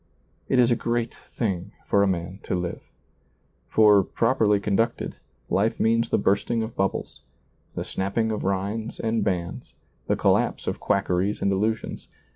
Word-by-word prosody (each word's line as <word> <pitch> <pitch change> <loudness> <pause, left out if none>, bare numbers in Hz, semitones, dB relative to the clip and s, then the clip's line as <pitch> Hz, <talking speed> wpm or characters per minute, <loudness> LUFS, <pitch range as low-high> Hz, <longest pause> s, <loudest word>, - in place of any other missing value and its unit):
It 130 - +3
is 125 -1 +5
a - - +4
great 120 0 -1
thing 95 -7 -4
for 100 - +3
a 100 - +4
man 90 +1 -2
to - - -1
live. 90 -1 -3 0.9
For, 105 -2 +6
properly 110 -2 +2
conducted, 105 +4 -1 0.3
life 110 +4 +1
means 115 +1 +2
the - - +2
bursting 105 +4 +1
of 110 +1 -6
bubbles, 95 0 -2 0.5
the - - -3
snapping 105 +4 -1
of 105 - -3
rinds 100 +4 -2
and 115 -1 0
bands, 90 -4 -3 0.3
the - - +2
collapse - - +1
of - - -2
quackeries 95 +1 0
and 100 - +2
illusions. 105 +3 -1
105 Hz, 150 wpm, -25 LUFS, 95-115 Hz, 0.9 s, For